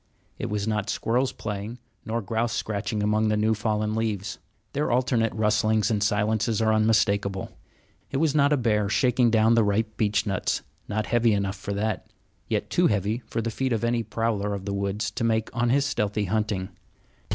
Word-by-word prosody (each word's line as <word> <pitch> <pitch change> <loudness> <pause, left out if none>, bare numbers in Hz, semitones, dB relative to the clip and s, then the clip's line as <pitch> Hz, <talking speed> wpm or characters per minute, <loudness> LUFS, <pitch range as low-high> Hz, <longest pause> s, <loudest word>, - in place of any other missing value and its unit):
It - - -2
was 105 0 -2
not 105 -1 -1
squirrels 125 +4 0
playing, 105 +2 -5 0.3
nor 115 0 -2
grouse 115 +3 -1
scratching 105 -1 -2
among 105 +1 +2
the 105 0 +2
new 110 +1 +2
fallen 105 0 -1
leaves. 105 -3 -2 0.3
Their 145 +2 0
alternate 120 -2 +2
rustlings 110 0 +2
and 105 -2 0
silences 105 +2 +1
are 110 -1 +3
unmistakable. 100 -3 +1 0.6
It 135 - -2
was 155 -1 +2
not 145 -1 +4
a 150 - +4
bear 105 -4 +1
shaking 125 +1 +3
down 110 0 +4
the 115 -1 +4
ripe 110 +2 0
beechnuts 105 -2 0 0.3
not 105 +1 -1
heavy 120 -1 +3
enough 100 -1 -1
for 100 +1 -5
that, 105 -1 -2 0.4
yet - - -2
too - - +4
heavy 105 +2 0
for 115 - -2
the 115 - -2
feet 130 +2 -1
of 115 - -1
any 120 0 +1
prowler 110 -2 -1
of 95 -1 -7
the 100 - -2
woods 100 +3 -2
to 110 - -3
make 110 +1 0
on 120 0 +1
his 140 +3 +3
stealthy 105 -5 -1
hunting. 105 -1 -1
110 Hz, 185 wpm, -26 LUFS, 105-115 Hz, 0.6 s, not